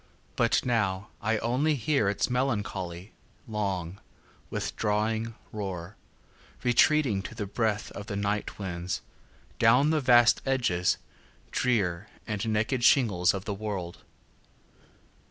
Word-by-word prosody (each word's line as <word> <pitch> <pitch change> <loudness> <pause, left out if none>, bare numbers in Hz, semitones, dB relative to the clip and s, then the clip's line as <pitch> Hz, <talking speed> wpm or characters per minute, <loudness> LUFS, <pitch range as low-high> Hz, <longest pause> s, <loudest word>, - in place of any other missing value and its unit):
But - - +2
now 105 -5 0
I 110 +1 +1
only 130 +8 +1
hearIts 110 -6 +1
melancholy, 105 -8 -2 0.4
long, 100 -5 -3 0.5
withdrawing 110 +1 -1 0.2
roar, 95 -2 -5 0.7
Retreating, 125 -3 +3
to 105 - -8
the 105 -2 -3
breathOf 105 0 -2
the 100 - -4
night 100 +1 -2
winds, 90 -3 -4 0.6
down 125 +6 +5
the 155 -1 +2
vast 120 -2 +5
edges 115 -10 +1 0.5
drearAnd 105 -1 -1
naked 110 +4 0
shingles 100 -10 +4
of 95 0 -5
the 105 - -2
world. 100 -4 -5
105 Hz, 100 wpm, -28 LUFS, 95-120 Hz, 0.7 s, down